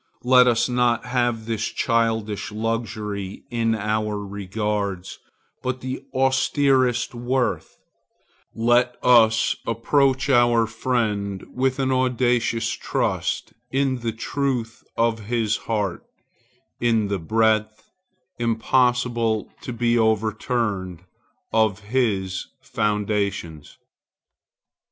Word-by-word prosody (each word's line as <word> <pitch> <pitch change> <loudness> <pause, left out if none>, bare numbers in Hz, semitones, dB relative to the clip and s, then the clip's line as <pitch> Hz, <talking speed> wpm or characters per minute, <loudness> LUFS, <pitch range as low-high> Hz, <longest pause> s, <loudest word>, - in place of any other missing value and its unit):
Let 125 0 +6
us 120 -1 +3
not 120 -2 +1
have 120 -2 0
this 110 -1 -2
childish 110 -3 -1
luxury 105 -3 -4
in 115 -1 +1
our 105 0 -1
regards, 100 -1 -3 0.4
but 130 0 -3
the 130 +1 -4
austerest 130 -1 +2
worth; 125 +1 -2 0.8
let 120 +2 +2
us 115 -3 +5
approach 135 +4 +2
our 120 -3 +4
friend 110 -4 -2
with 130 +1 0
an 135 -1 0
audacious 125 -3 +1
trust - - -2 0.2
in 135 -1 0
the 115 -1 -2
truth 120 0 -3
of 115 -2 +1
his 115 -1 0
heart, 105 -5 -1 0.8
in 115 -3 +2
the 100 -1 -2
breadth, 110 +3 0 0.5
impossible 120 -1 +1
to - - -6
be 120 0 +1
overturned, 110 -4 -1 0.5
of 110 -2 +2
his 100 -5 -1 0.2
foundations. 105 -7 -2
115 Hz, 95 wpm, -23 LUFS, 105-125 Hz, 0.8 s, Let